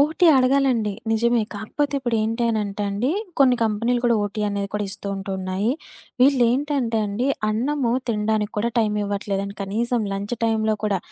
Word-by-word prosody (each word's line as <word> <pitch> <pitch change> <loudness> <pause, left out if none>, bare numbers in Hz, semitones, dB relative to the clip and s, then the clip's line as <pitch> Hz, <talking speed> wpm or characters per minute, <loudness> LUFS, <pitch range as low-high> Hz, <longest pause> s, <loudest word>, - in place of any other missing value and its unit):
OT 315 +5 +3
అడగాలండి. 255 -5 +2 0.2
నిజమే. 235 +1 +2
కాకపోతే 285 +8 -2
ఇప్పుడు 240 -3 -1
ఏంటీ 230 +2 -1
అనంటే 210 -2 -2
అండి, 225 +8 0 0.3
కొన్ని 255 -3 +5
కంపెనీలు 230 +3 0
కూడా 235 -1 +4
ఓటీ 205 +1 -4
అనేది 200 -1 -2
కూడా 210 -1 0
ఇస్తూ 200 0 -6
ఉంటున్నాయి. 190 +2 -2 0.5
వీళ్ళేంటంటే 255 -2 +2
అండి 205 +6 -2 0.2
అన్నము 245 +2 0 0.2
తిండానికి 210 -1 0
కూడా 235 +3 0
టైం 215 -2 +2
ఇవ్వట్లేదండి. 200 0 -3
కనీసం 230 +5 -1
లంచ్ 200 +4 -3
టైంలో 220 -1 +1
కూడా 200 -3 +1
220 Hz, 145 wpm, -23 LUFS, 205-245 Hz, 0.5 s, కొన్ని